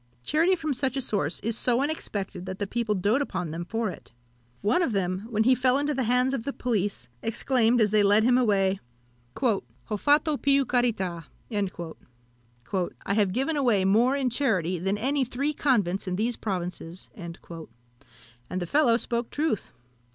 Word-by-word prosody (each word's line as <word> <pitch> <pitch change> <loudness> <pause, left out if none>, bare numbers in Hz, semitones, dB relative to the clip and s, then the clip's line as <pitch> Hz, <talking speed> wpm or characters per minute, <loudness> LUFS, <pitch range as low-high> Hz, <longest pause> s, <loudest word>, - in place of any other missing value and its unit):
Charity 330 - +3
from 315 -4 -2
such 265 +1 -1
a - - +1
source 195 - -1
is 225 +1 -1
so 245 +1 +2
unexpected, 200 - -3
that 185 0 -5
the 205 - -1
people 225 0 -1
doat 205 +8 +2
upon 180 - -3
them 165 +2 -4
for 225 +5 -2
it. - - -13 0.5
One 215 - +2
of 275 -10 0
them, 190 +1 -1
when 220 -2 +1
he 255 +3 +5
fell 255 +1 +3
into 290 +1 0
the 260 -3 -1
hands 250 +3 +2
of 255 -5 -2
the 280 - -2
police, 205 - -2
exclaimed, 235 +1 +2
as 210 -2 +3
they 215 -1 +5
led 205 +2 +5
him 245 +1 +4
away, 195 -6 +2 0.6
"Ho 230 -7 +2 0.4
fatto 295 - +3
più 275 0 +3
carità!" 200 - 0 1.8
"I 200 - 0
have 205 -2 +2
given 270 +9 0
away 235 -9 +2
more 230 +7 +4
in 265 -3 0
charity 185 - 0
than 195 +4 0
any 270 +5 +1
three 270 +4 -2
convents 205 -11 +1
in 180 - -1
these 230 +5 0
provinces." 180 -3 -5
And 170 -3 -7 1.2
the 175 - -3
fellow 240 - +3
spoke 235 -1 -2
truth. 295 - -1
230 Hz, 170 wpm, -26 LUFS, 195-265 Hz, 1.8 s, he